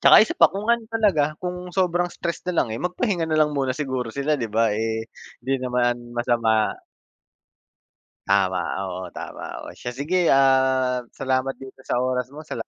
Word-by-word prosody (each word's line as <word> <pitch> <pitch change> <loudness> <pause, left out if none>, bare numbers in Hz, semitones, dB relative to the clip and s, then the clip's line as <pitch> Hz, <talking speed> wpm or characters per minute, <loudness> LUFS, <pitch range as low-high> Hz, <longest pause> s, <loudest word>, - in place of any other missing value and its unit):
Tsaka - - +8
isa - - -4
pa - - +8
kung 200 +2 -4
ano 235 -1 +3
talaga, 200 -10 +3 0.2
kung 180 0 -3 0.2
sobrang 175 -1 +2
stress 170 -1 -3
nalang 175 -8 +1
eh, 115 - -4
magpahinga 180 0 0
nalang 155 -1 +2
muna 135 -2 +1
siguro 130 -4 -2
sila, 140 +2 0
'di 115 -5 -3
ba, 115 - +5
eh, 110 0 -2 0.4
di 135 - +2
naman 125 -1 +1 0.2
masama. 120 -2 +2 1.8
Tama, 95 -2 +2 0.2
oo, 95 -1 -5
tama, - - -7 0.2
oo, - - -8
siya 120 - -6
sige, 170 +5 +1
ah, 130 -1 +3 0.2
salamat 130 0 -1
dito 135 0 -11
sa - - 0
oras 125 -1 0
mo. 155 +2 -9
Salamat 155 - -6
135 Hz, 165 wpm, -23 LUFS, 120-170 Hz, 1.8 s, Tsaka